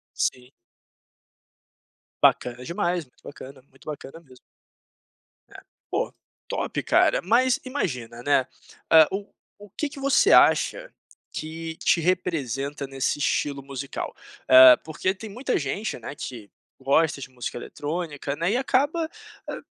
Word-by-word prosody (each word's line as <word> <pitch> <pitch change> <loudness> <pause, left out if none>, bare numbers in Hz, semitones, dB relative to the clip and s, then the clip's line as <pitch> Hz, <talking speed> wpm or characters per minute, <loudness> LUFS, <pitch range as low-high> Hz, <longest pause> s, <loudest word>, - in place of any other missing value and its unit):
Sim. 125 0 -2 1.7
Bacana 125 0 +3
demais, 175 0 -1
muito 125 - -31
bacana, 135 -2 -11
muito 135 - -22
bacana 155 +1 -8
mesmo. 130 -5 -19 1.1
É - - -13 0.3
poxa, - - -1 0.4
top - - -2
cara, - - +3
mas 240 +6 +3
imagina, 125 - -4
né, 135 -1 +2 0.5
hã, 160 -1 +9
o 200 +1 -4 0.3
o 205 - -12
que 300 - -2
que 280 - -10
você 275 0 +4
acha - - +4 0.4
que 160 +1 -6
te 170 - +4
representa 145 -6 -1
nesse 135 +1 -2
estilo 140 -1 -1
musical? 140 0 -6 0.3
Hã, 130 -1 +10
porque 160 +4 -2
tem 220 +3 -9
muita 245 +6 -2
gente, 165 +6 -3
né, 120 - -8
que 115 -7 -8 0.3
gosta 145 +2 +2
de - - -7
música 125 -1 -6
eletrônica, 145 -1 -4
né, 170 +6 0
e - - +2
acaba, 285 +5 +1 0.4
ah, - - -5
155 Hz, 130 wpm, -25 LUFS, 135-190 Hz, 1.7 s, Hã